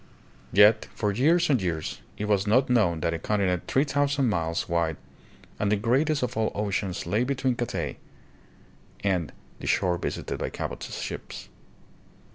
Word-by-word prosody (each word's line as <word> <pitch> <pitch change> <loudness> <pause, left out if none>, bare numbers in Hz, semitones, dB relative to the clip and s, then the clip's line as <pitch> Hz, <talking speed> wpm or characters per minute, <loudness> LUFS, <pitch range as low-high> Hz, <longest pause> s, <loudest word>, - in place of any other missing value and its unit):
Yet 105 +3 +6
for 105 - 0
years 165 - +3
and 130 -7 +2
years 85 -4 -3 0.2
it 105 - -2
was 105 -1 +1
not 125 +5 +3
known 90 -9 +3
that 85 - 0
a 85 - -3
continent 95 -2 0
three 135 - +3
thousand 140 -2 +1
miles 85 -4 -1
wide 85 -3 0 0.6
and 105 -1 +1
the - - +5
greatest 135 +7 +1
of 125 - -2
all 110 0 +1
oceans 100 -2 -2
lay 110 +4 +1
between 130 0 0
Cathay 95 - -3 1.1
and 90 -5 0 0.3
the - - -6
shore 90 -1 +2
visited - - -4
by - - -2
Cabot's - - -5
ships. - - -7
105 Hz, 155 wpm, -26 LUFS, 90-125 Hz, 1.1 s, Yet